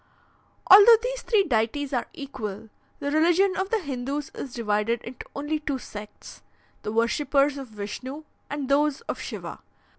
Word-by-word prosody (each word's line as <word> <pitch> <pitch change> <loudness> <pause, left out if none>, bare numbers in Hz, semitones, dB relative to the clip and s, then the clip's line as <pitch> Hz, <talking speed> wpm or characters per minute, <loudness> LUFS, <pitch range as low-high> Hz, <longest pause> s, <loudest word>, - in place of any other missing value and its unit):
"Although 415 +4 +10
these - - -3
three 430 -4 +3
deities 275 - 0
are 245 - -1
equal, 225 -6 -7 0.3
the 285 - -3
religion 350 +5 +3
of 380 +1 -2
the 450 - +2
Hindoos 280 +1 -4
is 270 - -6
divided 225 0 0
into 240 +1 -9
only 295 +2 -2
two 290 -3 -2
sects 210 -4 -10 0.4
the 210 - -4
worshippers 275 +5 +2
of 270 - -7
Vishnu 230 +7 -7 0.3
and 285 -2 -3
those 285 +1 +2
of - - -5
Shiva. - - -6
280 Hz, 150 wpm, -25 LUFS, 235-310 Hz, 0.4 s, Although